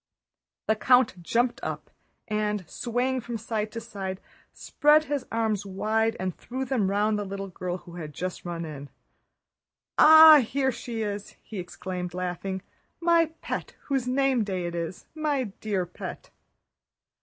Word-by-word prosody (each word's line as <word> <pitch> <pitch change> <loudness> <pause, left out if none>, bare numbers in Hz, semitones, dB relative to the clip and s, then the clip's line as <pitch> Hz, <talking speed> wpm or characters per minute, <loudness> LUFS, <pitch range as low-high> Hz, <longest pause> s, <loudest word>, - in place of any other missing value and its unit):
The 220 - +2
count 245 -5 +3
jumped 235 +7 +1
up - - -5 0.4
and, 210 -3 -1
swaying 250 +4 -1
from 235 0 -4
side 215 -1 -3
to 230 - -3
side, 195 -4 -5 0.3
spread 300 +1 +3
his 285 -3 -3
arms 220 -3 0
wide 220 +3 0
and 185 -1 -2
threw 260 +2 -5
them 240 -7 +1
round 210 +1 +1
the - - -2
little 195 0 -5
girl 180 0 -4
who 175 -1 -12
had 155 -3 -7 0.2
run 170 -1 -4
in. 145 -2 -8 1.1
"Ah, 315 0 +10
here 265 +2 0
she 230 -2 -4
is!" 205 -1 -5
he 215 - -7
exclaimed 180 0 -5
laughing. 185 +1 -3 0.4
"My 335 -1 +4
pet, - - -4
whose 270 -3 0
name 260 -2 +2
day 185 -3 -3
it 170 - -4
is. 170 +1 -4
My 300 -4 0 0.2
dear 200 -4 -1
pet!" 175 - -8
215 Hz, 145 wpm, -27 LUFS, 185-255 Hz, 1.1 s, Ah